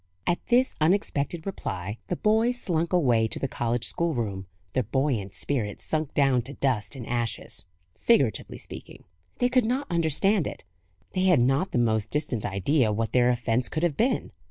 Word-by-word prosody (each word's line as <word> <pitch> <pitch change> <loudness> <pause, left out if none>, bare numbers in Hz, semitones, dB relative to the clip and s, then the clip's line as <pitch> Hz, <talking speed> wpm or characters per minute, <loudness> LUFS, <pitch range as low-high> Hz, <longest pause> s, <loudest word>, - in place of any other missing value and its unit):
At 175 - 0
this 250 +2 +3
unexpected 165 -2 +1
reply, 100 - -4
the 180 - -1
boys 225 +5 +2
slunk 170 -4 -1
away 125 -11 +3
to - - -4
the 135 - -1
college 120 -2 -1
schoolroom, 115 - -1 0.3
their 130 - +2
buoyant 115 -5 -1
spirits 110 -3 -2
sunk 155 -2 -2
down 135 -3 +3
to 135 +4 -7
dust 125 -3 -1
and 125 -4 -7
ashes 120 -5 -2 0.3
figuratively 135 - +1
speaking. - - -10 0.3
They 245 - +3
could 250 0 +3
not 255 +5 0
understand 170 +3 +2
it; - - -7 0.5
they 185 0 0
had 180 -6 +5
not 135 +9 +2
the - - 0
most 110 -3 +1
distant 145 -7 -1
idea 110 +5 +1
what 110 +2 -1
their 125 -1 +4
offence 120 0 0
could 155 - -2
have 170 -5 +1
been. 245 - 0
135 Hz, 170 wpm, -26 LUFS, 115-175 Hz, 0.5 s, had